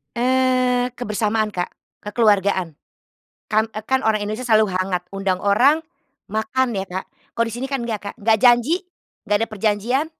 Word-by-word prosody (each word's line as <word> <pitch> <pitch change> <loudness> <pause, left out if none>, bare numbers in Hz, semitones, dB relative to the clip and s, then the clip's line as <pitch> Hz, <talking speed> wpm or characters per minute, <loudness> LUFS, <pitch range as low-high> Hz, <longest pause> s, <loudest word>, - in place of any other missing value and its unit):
Eee, 255 0 +2
kebersamaan, 215 -2 -1
Kak. 180 -3 -4 0.3
Kekeluargaan. 200 -6 +1 0.7
Kan, 220 +1 +3
eee, 215 0 -8
kan 265 +2 +1
orang 220 -4 +1
Indonesia 220 +4 -4
selalu 215 -3 +4
hangat, 185 -1 -1
undang 195 -2 -1
orang 270 +11 +4 0.5
makan 260 +3 0
ya, 195 -2 -3
Kak. 185 +1 -4 0.3
Kalau 230 0 +2
di - - -7
sini 250 +2 -3
kan 270 -4 -2
nggak, 220 -3 -3
Kak. - - -35
Nggak 220 -1 +2
janji, 250 +8 +4 0.5
nggak 205 - +3
ada - - -17
perjanjian. 220 +7 0
220 Hz, 160 wpm, -21 LUFS, 205-250 Hz, 0.7 s, selalu